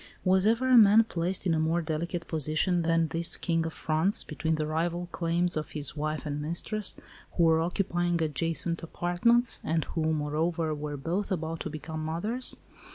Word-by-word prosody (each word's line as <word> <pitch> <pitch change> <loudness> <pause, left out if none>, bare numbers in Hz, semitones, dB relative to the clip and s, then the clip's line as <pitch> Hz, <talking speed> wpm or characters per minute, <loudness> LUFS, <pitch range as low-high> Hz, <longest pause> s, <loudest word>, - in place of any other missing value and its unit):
Was 190 +1 +3
ever 255 +3 +3
man 220 -1 +7
placed 180 -3 -1
in 175 - +2
a 160 - +1
more 160 +2 +1
delicate 170 +1 -3
position 160 +3 0
than 165 -1 +1
this 165 0 +2
King 165 -2 -1
of 165 - -6
France, 160 +6 +1
between 160 +1 -2
the 155 -1 -2
rival 170 +3 -2
claims 175 +1 0
of 155 -1 -3
his 150 -1 -4
wife 155 +1 -3
and 145 0 -3
mistress, 180 +7 -2 0.4
who 170 - +2
were 160 -1 +4
occupying 175 -1 -1
adjacent 165 +2 0
apartments, 175 +9 +2
and 160 0 0
who, 160 -1 0
moreover, 155 +2 -1
were 150 -1 -5
both 180 +9 -3
about 165 -2 -3
to - - -4
become 155 +1 -6
mothers? 210 +11 -3
165 Hz, 170 wpm, -28 LUFS, 155-175 Hz, 0.4 s, man